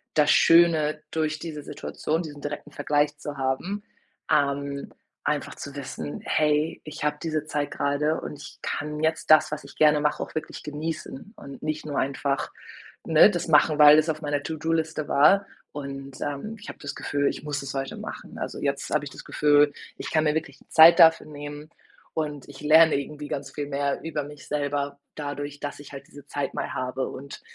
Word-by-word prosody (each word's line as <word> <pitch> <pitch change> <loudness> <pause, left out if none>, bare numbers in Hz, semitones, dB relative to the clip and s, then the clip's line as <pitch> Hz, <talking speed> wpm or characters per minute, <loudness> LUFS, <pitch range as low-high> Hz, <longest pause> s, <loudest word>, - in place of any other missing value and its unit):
das 150 -1 +5
Schöne 160 -3 +5
durch 155 -1 -1
diese 150 -3 -6
Situation 160 +3 -3
diesen 145 -3 -9
direkten 145 0 -6
Vergleich 145 0 0
zu 145 -1 -7
haben, 135 +10 -2 0.5
ähm, 140 -1 0 0.3
einfach - - -1
zu 140 0 -8
wissen: 80 - -6
„Hey, 150 +1 +1
ich 155 0 -8
habe 150 0 0
diese 155 -2 -1
Zeit 145 -2 -2
gerade 145 +2 0
und 150 - -7
ich - - -11
kann 150 +1 -3
jetzt 160 0 0
das, 155 0 +6
was 150 - -5
ich - - -13
gerne 150 -1 +5
mache, 150 0 0
auch - - -11
wirklich 155 - -5
genießen.“ 155 +5 -6
Und 140 -1 -11
nicht 155 0 -3
nur 145 -2 -4
einfach, 140 0 -1 0.5
ne, - - +7
das - - -3
machen, 155 -1 +4
weil 150 0 +10
das 155 +1 +3
auf 155 0 -2
meiner 145 -1 -1
To-do-Liste 160 -1 -2
war. 195 +8 +5 0.3
Und, 135 -2 -7
ähm, 145 +10 -4
ich 215 - -10
habe - - -9
das 145 -1 -6
Gefühl, 145 0 -1
ich - - -3
muss 145 -2 -3
es 140 -1 -6
heute 135 -1 -4
machen. - - -8
Also, - - -5
jetzt - - -2
habe - - +1
ich - - -7
das - - -11
Gefühl, 145 -1 +4 0.2
ich - - -5
kann 155 - +3
mir 150 -1 +2
wirklich 155 -3 -3
die - - -25
Zeit 165 +1 +8
dafür 160 -2 +7
nehmen 145 0 -8 0.4
und 150 -3 -3
ich 140 -1 -12
lerne 160 +2 +6
irgendwie 145 +1 -4
ganz 140 -1 -5
viel 145 -1 -4
mehr 140 0 -1
über 155 -2 -3
mich 145 +1 -11
selber 145 -1 -2 0.2
dadurch, 145 -1 -5
dass 145 0 -5
ich 145 - -12
halt 140 -1 -9
diese 145 -1 -14
Zeit 140 0 -3
mal - - -3
habe 130 +1 -2
und 140 +2 -9
150 Hz, 195 wpm, -26 LUFS, 140-155 Hz, 0.5 s, weil